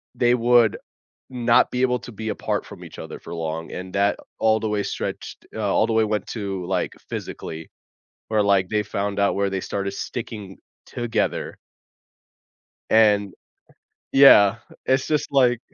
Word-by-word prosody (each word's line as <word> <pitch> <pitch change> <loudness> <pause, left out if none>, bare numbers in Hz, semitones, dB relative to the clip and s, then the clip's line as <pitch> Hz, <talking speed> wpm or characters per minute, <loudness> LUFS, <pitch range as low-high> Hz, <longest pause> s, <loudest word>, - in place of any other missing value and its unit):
they 120 0 +3
would 120 -2 +4 0.5
not 120 -2 +3
be 125 - -1
able 125 -1 +2
to - - -10
be 110 +1 -5
apart - - -2
from - - -12
each - - -12
other - - -8
for - - -8
long, 80 0 -4
and 95 +1 -7
that 100 +1 +2 0.2
all 110 0 +3
the 110 - -2
way 105 -1 0
stretched - - -5
uh, 110 - -5
all - - +3
the - - -2
way 110 0 +3
went 105 0 -2
to, 100 -4 -4
like, 90 -1 -1 0.2
physically, 80 0 -6 0.6
where, 110 -1 +2
like, 100 -2 +2
they 105 +1 0
found 100 0 -3
out 100 0 +2
where 100 0 0
they 95 -1 -2
started 100 +1 -3
sticking 105 -2 -6 0.3
together 120 -1 -2 1.3
and 105 -3 +4 0.8
Yeah, 110 -7 +7 0.3
it's 130 0 +1
just, 150 -2 -1
like 125 -4 +3
105 Hz, 160 wpm, -23 LUFS, 100-120 Hz, 1.3 s, Yeah